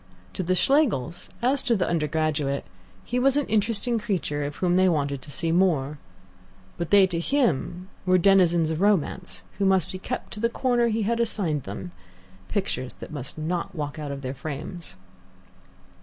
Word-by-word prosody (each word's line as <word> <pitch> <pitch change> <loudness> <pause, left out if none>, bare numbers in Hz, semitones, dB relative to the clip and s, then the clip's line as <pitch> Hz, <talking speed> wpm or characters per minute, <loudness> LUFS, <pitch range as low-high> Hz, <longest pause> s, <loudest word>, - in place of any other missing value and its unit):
To - - -3
the 185 +1 +1
Schlegels, 190 - +1
as 265 +2 +3
to 245 -4 +2
the 190 - 0
undergraduate, 150 -3 0 0.4
he 245 - -1
was 270 +2 +4
an 290 - +1
interesting 225 +2 +1
creature, 165 -8 -2
of 145 +1 -4
whom 180 -1 +1
they 185 0 +5
wanted 140 -4 0
to 145 - -12
see 165 +4 -2
more. 155 -5 +2 0.8
But 170 -2 -2
they 200 0 +7
to 175 -3 -2
him 185 - 0 0.2
were 185 0 +4
denizens 175 -3 +4
of 160 +2 -2
Romance, 190 -2 0 0.2
who 200 - +2
must 190 -4 +3
keep 185 0 -8 0.2
to 210 - -7
the 230 +2 +2
corner 240 -1 +1
he 225 -1 0
had 230 +3 0
assigned 185 - 0
them, 105 - -6 0.6
pictures 130 -11 -2
that - - -10
must 140 -1 -5
not 170 +3 -3
walk 150 -1 -4
out 145 -2 -4
of 140 0 -6
their 130 0 -3
frames. 155 +5 -6
180 Hz, 170 wpm, -25 LUFS, 150-210 Hz, 0.8 s, they